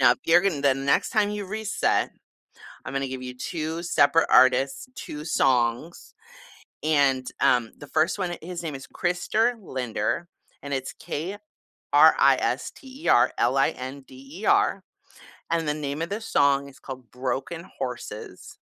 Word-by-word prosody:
Now, 120 - +7
if - - -8
you're 170 +1 +6
gon 180 -6 0
the 140 -2 +4
next 135 +1 +1
time 210 -2 +2
you 210 -1 -4
reset, 215 +2 0 0.8
I'm - - -6
gonna 135 0 -1
give 130 0 -6
you 125 0 -6
2 160 +4 -4
separate 165 -1 +3
artists, 135 - +4
2 150 0 -7
songs, 130 +1 0 0.7
and, 140 -4 +2
um, 120 -3 +3
the 145 - -10
1st 155 +7 +1
one, 180 -3 -2
it 170 - -9
his 175 0 -6
name 160 -3 -4
is 135 -1 -8
Krister 200 +7 0
Linder, 130 - -3 0.3
and 140 - -6
it's, 135 0 -3 0.8
K-R-I-S-T-E-R 265 - +3
L-I-N-D-E-R, 135 - 0 0.7
and 165 -2 0
the 150 - +1
name 150 0 -4
of 165 - -3
the 205 +3 -3
song 140 -9 +2
is 135 - -16
called 130 -3 -9
“Broken 135 +6 -4
Horses.” 125 -5 -7
140 Hz, 140 wpm, -25 LUFS, 130-175 Hz, 0.8 s, Now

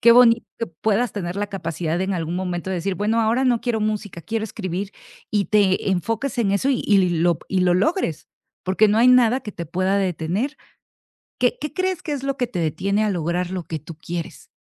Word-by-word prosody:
Qué 235 - +7
bonito 235 -1 +6
que 230 - 0
puedas 215 +8 0
tener 180 -3 -4
la 205 0 -2
capacidad 170 -3 -3
en 190 +1 0
algún 165 -1 -2
momento 180 0 -3
de 190 - -1
decir: 185 +3 -1
"Bueno, 215 +5 +1
ahora 230 +4 +2
no 245 -3 +3
quiero 240 -2 -1
música, 210 -4 -3
quiero 225 +3 -2
escribir". 195 -2 -4 0.4
Y 205 -2 +1
te 200 -2 +2
enfoques 225 - -1
en 205 -4 +2
eso 200 +8 +1
y 265 - +1
y 195 -3 +4
lo 170 0 +2
y 190 - +1
lo 180 -1 +3
logres, 185 - 0 0.4
porque 190 +4 +3
no 210 - +2
hay 235 +3 +6
nada 250 0 +5
que 210 -5 -8
te 170 - -6
pueda 185 +4 +1
detener, 190 - -1 0.8
¿qué 245 -1 +3
qué 300 - -3
crees 370 +1 -1
que 305 - -5
es 275 -2 -4
lo 275 0 -1
que 245 - 0
te 230 - -6
detiene 195 +6 0
a 210 - +1
lograr 175 +1 -1
lo 185 -2 -3
que 160 - -4
tú 155 +2 -10
quieres? 170 +1 -6
200 Hz, 220 wpm, -22 LUFS, 175-230 Hz, 0.8 s, Qué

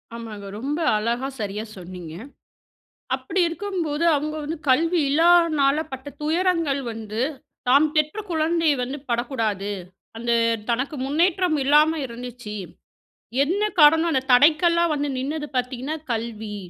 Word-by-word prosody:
ஆமாங்க. 215 -3 -8
ரொம்ப 290 +5 -2 0.2
அழகா 235 +5 -1
சரியா 210 0 -3
சொன்னீங்க. 180 -3 -9 1.0
அப்படி 380 - -3
இருக்கும்போது 335 -3 -3
அவங்க 305 +2 -2
வந்து 320 +3 -4
கல்வி 330 +6 +3
இல்லானால 315 -3 +4
பட்ட 265 +1 -7 0.2
துயரங்கள் 325 -3 +1
வந்து 220 0 -5 0.5
தாம் 285 +4 +6
பெற்ற 305 +7 +1
குழந்தையை 320 -1 +2
வந்து 265 +4 -4
படக்கூடாது. 225 -5 -1 0.5
அந்த 235 +1 -2 0.4
தனக்கு 255 +5 -1
முன்னேற்றம் 340 +3 +2
இல்லாம 300 +3 +4
இருந்துச்சு. 240 -3 -8 0.9
என்ன 375 +8 -1 0.2
காரணம் 320 +3 +6
அந்த 260 - +1
தடைக்கல்லா 320 +6 +5
வந்து 290 0 -1
நின்னது 295 +3 -3
பார்த்தீங்கன்னா, 255 +4 -2 0.2
கல்வி. 220 -2 -4
285 Hz, 115 wpm, -23 LUFS, 235-320 Hz, 1.0 s, தாம்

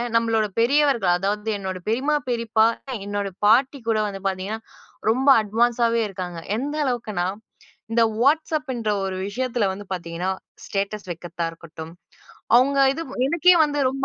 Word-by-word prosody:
நம்மளோட 225 -2 +2
பெரியவர்கள், 240 -6 +3
அதாவது 210 +3 -2
என்னோட 190 -1 -4
பெரியம்மா, 270 +7 +1
பெரியப்பா 230 -2 +2 0.4
என்னுடைய 200 -1 -3
பாட்டி 260 +6 +4
கூட 220 - +2
வந்து 195 -1 -6
பார்த்தீங்கன்னா, 195 +3 -3 0.5
ரொம்ப 260 +5 +3
அட்வான்ஸ் 230 +3 +1
ஆவே 230 0 +1
இருக்காங்க. 180 -3 -6 0.2
எந்த 285 +5 -3
அளவுங்குன்னா, 215 -8 -1 0.7
இந்த 230 0 +4 0.2
WhtsAppன்ற 285 -5 +1
ஒரு 190 -1 -3
விஷயத்தில 240 +1 -1
வந்து 200 +2 -8
பார்த்தீங்கன்னா, 175 0 -3 0.3
ஸ்டேட்டஸ் 200 +1 -3
வைக்கிறதா 170 0 -5
இருக்கட்டும், 165 -1 -10 0.6
அவுங்க 265 +3 +4 0.2
இது 330 - -4 0.2
எனக்கே 345 +4 +5
வந்து 290 -1 -1
ரொம்ப 270 +1 -5
220 Hz, 130 wpm, -23 LUFS, 195-260 Hz, 0.7 s, எனக்கே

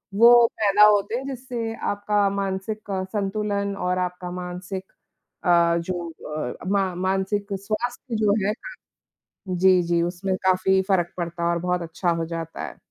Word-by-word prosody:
वो 235 +2 +8
पैदा 210 0 +6
होते 210 +1 +3
हैं 265 - -5
जिससे 245 -4 -4
आपका 205 -1 0
मानसिक 200 +2 -3
अ, 190 -1 -1
संतुलन 200 -1 -1
और 180 -1 -1
आपका 180 0 -3
मानसिक 180 +1 -6 0.6
अ, 170 -1 +4
जो 175 0 -4 0.3
अ, 125 -5 -3
मा 195 -1 +1
मानसिक 190 +2 -1
स्वास्थ्य 225 +5 -3
जो 210 -2 +3
है 210 - +2
हाँ, - - -9 0.8
जी, 185 0 +5
जी, 170 0 +1
उसमें 180 +2 -2
काफ़ी 190 +1 +3
फ़र्क 175 -3 +1
पड़ता 170 -1 -2
और 170 - +1
बहुत 180 0 0
अच्छा 170 +2 -1
हो 165 -1 0
जाता 165 -1 -5
है। - - -10
190 Hz, 155 wpm, -24 LUFS, 180-210 Hz, 0.8 s, वो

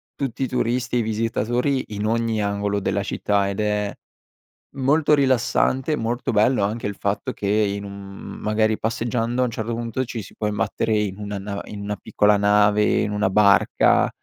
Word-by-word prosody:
tutti 135 -2 -3
i - - 0
turisti 125 0 -1
e - - +3
i - - +2
visitatori 115 +4 0
in 105 +1 -2
ogni 115 -1 0
angolo 100 0 -1
della 100 +1 -1
città, 100 -1 0
ed 100 - -4
è 105 -1 -1 0.8
molto 145 +3 +3
rilassante, 130 +1 +1
e - - +2
molto 120 +2 -2
bello 110 +1 +3
anche 110 +2 -2
il 100 - -4
fatto 100 0 -2
che 100 - -4
in 100 -1 +1
un, 100 - -7
mhmm, 100 0 -9
magari 110 0 +1
passeggiando 115 +2 -1
a - - +3
un 120 - -3
certo 115 +1 -3
punto 120 +2 -2
ci 115 -2 -5
si - - -13
può 105 - -2
imbattere 105 +1 -1
in 105 -1 -2
una 105 -1 -4
na 100 0 -5
in 100 -1 -8
una 105 0 -3
piccola 105 +1 +2
nave, 105 +1 +4 0.2
in 105 - -1
una 105 -1 +1
barca 100 -1 +4
105 Hz, 190 wpm, -22 LUFS, 100-120 Hz, 0.8 s, nave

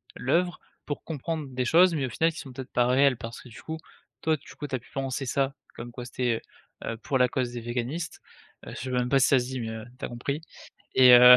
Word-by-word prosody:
l'œuvre 175 +7 +1 0.3
pour 145 - -4
comprendre 160 -1 -3
des 125 -1 -1
choses, 175 +6 +6
mais 145 -5 0
au - - -3
final 165 +7 +2
qui 155 - -8
sont 140 -3 -8
peut-être 130 0 -7
pas 120 - +3
réelles 130 0 +5
parce 115 +1 -7
que - - -13
du 115 - -11
coup, 160 0 -4 0.4
toi 160 0 +3
du 140 - -14
coup, 145 - -5
tu 135 - -2
as 130 - -2
pu - - -20
penser 135 0 -2
ça. 135 +2 +1 0.2
Comme 120 0 -7
quoi 120 0 -7
c'était, 120 -2 0 0.4
heu - - -2
heu, - - -7
pour 135 +4 0
la 125 -1 +5
cause 125 -2 -1
des 120 - -4
véganistes, 125 +8 -3 0.4
heu, - - -7
je - - -8
sais 130 - -4
même 125 -1 +1
pas 135 - +5
si 130 - +5
ça 135 - +5
se 125 - -2
dit, 130 0 -4
mais, 115 - -3
heu, 110 0 -6
tu - - -4
as - - -3
compris 140 +5 -3 0.5
et 125 -1 +9
heu, 125 0 +11
130 Hz, 270 wpm, -28 LUFS, 125-145 Hz, 0.5 s, heu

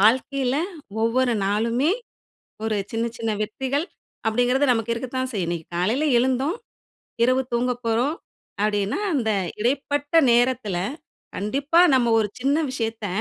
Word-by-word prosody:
வாழ்க்கையில 255 +4 +2 0.5
ஒவ்வொரு 245 +1 +2
நாளுமே, 230 - +1 0.8
ஒரு 220 -1 0 0.2
சின்ன 225 +1 0
சின்ன 225 -1 -1
வெற்றிகள் 265 +8 -2 0.4
அப்படிங்கிறது 245 +5 +2
நமக்கு 225 -1 0
இருக்கத்தான் 260 +2 -3
செய்யும். 190 -5 -1
இன்னைக்கு 170 -2 -4
காலையில 230 - +1
எழுந்தோம், 260 - +1 0.7
இரவு 255 +2 +3
தூங்கப் 245 +1 0
போறோம் 240 +7 +1 0.5
அப்படின்னா 205 - 0
அந்த 235 -6 +1 0.3
இடைப்பட்ட 285 +5 -1 0.2
நேரத்தில, 240 -5 +2 0.6
கண்டிப்பா 280 +10 +2 0.2
நம்ம 235 -3 +2
ஒரு 210 - -1
சின்ன 275 +4 +2 0.2
விஷயத்த 225 -4 -3
245 Hz, 120 wpm, -23 LUFS, 220-265 Hz, 0.8 s, இரவு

